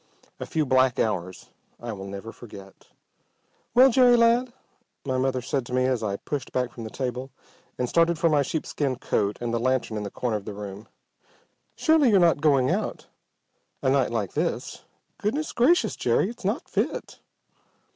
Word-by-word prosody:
A - - -5
few 155 -2 0
black 130 -1 +3
hours 95 -4 -2 0.3
I 120 -1 -5
will 95 -1 -8
never 100 +3 -7
forget. 100 -5 -13 0.9
"Well, 260 +2 +7
Jerry, 245 -1 +6
lad!" 235 +2 +3 0.5
my 130 -2 -1
mother 130 -1 0
said 135 +1 -1
to - - -7
me 130 0 +2
as 130 -2 0
I 100 -2 -2
pushed 135 +5 -5
back 125 -1 -1
from 115 -2 -8
the - - -6
table 130 +1 -4 0.5
and 125 - -1
started 170 +4 +2
for 170 +1 +2
my 150 -3 +3
sheepskin 140 -1 -2
coat 105 -4 -1
and 120 -1 -3
the 115 - +1
lantern 130 -2 0
in 105 - -3
the 100 - -4
corner 115 +1 -2
of 100 - -10
the 105 - -6
room. 100 +1 -8 0.9
"Surely 315 -5 +4
you're 200 -3 +5
not 170 -4 +3
going 140 -4 +3
out - - -2 0.8
a 130 - +3
night 135 -2 +2
like 110 -5 -3
this? - - -3 0.3
Goodness 290 +10 -2
gracious, 295 +9 +3
Jerry, 200 - +1
it's 240 - -14
not 205 +9 -2
fit!" - - -3
130 Hz, 175 wpm, -25 LUFS, 115-170 Hz, 0.9 s, Well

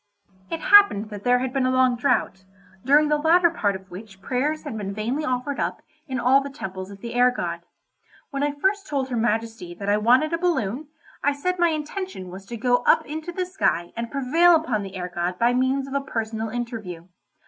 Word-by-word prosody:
It 330 - -4
happened 395 - +5
that 205 -1 -8
there 245 0 +4
had 255 0 -3
been 265 -2 +1
a - - +2
long 255 -1 +3
drought, 240 -6 0 0.4
during 295 +4 +5
the 300 0 +2
latter 340 +2 +4
part 205 - 0
of 190 0 -11
which 195 +1 -11
prayers 270 +9 -2
had 290 -7 -6
been 200 -2 -5
vainly 240 +8 -2
offered 255 +1 -2
up - - -3 0.2
in 260 -3 -3
all 260 +3 +4
the 280 - -6
temples 190 -9 -7
of 200 -1 -12
the 235 0 -6
air 245 +1 +5
god. 170 -8 -4 0.7
When 275 -1 -3
I 290 0 +1
first 390 +7 -1
told 275 -3 -2
her 250 - -2
Majesty 225 -5 -2
that 200 +2 -4
I 205 - +3
wanted 255 +9 +3
a 330 - 0
balloon, 295 - -1 0.4
I 285 - +3
said 365 +6 -2
my 345 -1 +4
intention 310 - -5
was 190 +1 -10
to 235 - -6
go 245 +2 +2
up - - +3
into 315 +3 -6
the 365 +1 -2
sky 265 - -1
and 230 0 -4
prevail 320 +7 +4
upon 285 -10 0
the 195 -1 -8
air 180 -1 -5
god 175 +1 -2
by 235 +3 +3
means 260 +2 +1
of 275 - -8
a 280 - 0
personal 225 -4 -3
interview. 215 -8 -6
250 Hz, 215 wpm, -24 LUFS, 210-295 Hz, 0.7 s, happened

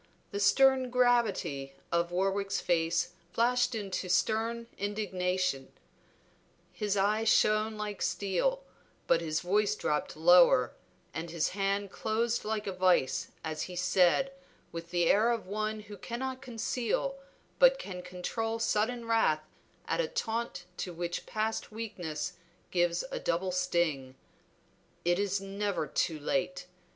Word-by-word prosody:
The 200 - -3
stern 260 +5 +4
gravity 230 - +1 0.2
of 170 0 +1
Warwick's 195 +2 0
face 170 0 +1 0.2
flashed 245 +1 +2
into 195 -3 -3
a - - -9
stern 225 +5 +1
indignation. 185 -7 -1 1.0
His 205 -1 -1
eye 210 +3 +2
shone 215 0 +3
like 210 -1 -4
steel, 200 - 0 0.4
but 170 - +3
his 155 -1 -1
voice 205 +3 +2
dropped 150 -5 -2
lower 170 -6 +6 0.4
and 165 +1 -4
his 165 -1 0
hand 195 0 -1
closed 225 +3 -1
like 215 0 -2
a 195 - -2
vice 185 -7 +2 0.2
as 155 -1 -3
he 180 - -7
said, 180 +8 +3 0.4
with 170 0 -7
the 175 -1 +1
air 215 +7 +4
of 235 -2 -1
one 215 +2 -2
who 205 -1 -10
cannot 260 +5 -4
conceal 250 +2 -2 0.4
but - - +7
can 180 - -6
control 185 +6 -3
sudden 230 +1 0
wrath 225 -10 +2 0.4
at - - +1
a 480 - -1
taunt 230 - -3
to 180 - -4
which 175 0 -4
past 220 +1 -2
weakness 185 -9 -4 0.4
gives 175 -1 +1
a - - -3
double 175 +2 -1
sting 170 -8 0 0.9
"It 195 +3 +1
never 195 -3 -2
is 135 - -15
too 160 -2 0
late. 180 +4 -1
200 Hz, 135 wpm, -31 LUFS, 175-225 Hz, 1.0 s, but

